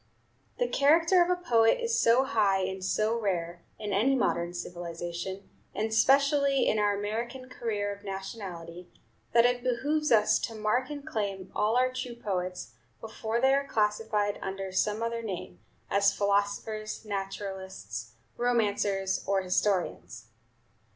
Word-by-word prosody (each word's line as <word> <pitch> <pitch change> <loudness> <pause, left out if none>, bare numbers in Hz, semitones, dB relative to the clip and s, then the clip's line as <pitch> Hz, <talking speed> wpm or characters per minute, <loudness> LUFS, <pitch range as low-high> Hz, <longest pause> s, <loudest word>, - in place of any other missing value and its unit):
The - - +1
character 330 +3 +4
of 360 0 -1
poet 225 - +4
is 465 -1 +1
so 235 +3 +5
high 205 -7 +2
and 190 0 -3
so 215 +4 +1
rare, 175 -5 -2 0.2
in 210 -2 -4
any 245 +8 +3
modern 175 -9 0
civilization, 175 +2 -5 0.3
and 220 +2 -1
specially 275 +4 +4
in 215 - +2
our 205 -1 +2
American 235 +5 -4
career 210 -5 -2
of 200 0 -14
nationality, 190 -3 -7 0.4
that 235 0 +5
it 245 0 +1
behooves 290 +5 0
us 215 -2 +5
to 225 - -4
mark 215 +5 0
and 290 -1 -7
claim 200 -9 -3
all 215 +3 +2
our 255 0 +2
true 255 -2 -5
poets, 185 - -4 0.3
before 220 +1 -3
they 265 +2 +4
are 275 0 +1
classified 210 -2 0
under 195 0 -4
some 210 +4 0
other 230 0 -2
name, 185 - -6 0.3
as 200 0 +3
philosophers, 205 +2 -1
naturalists, 190 - -5 0.2
romancers, 205 -5 +1
or 195 -1 +1
historians. 185 0 -1
210 Hz, 135 wpm, -29 LUFS, 195-240 Hz, 0.4 s, so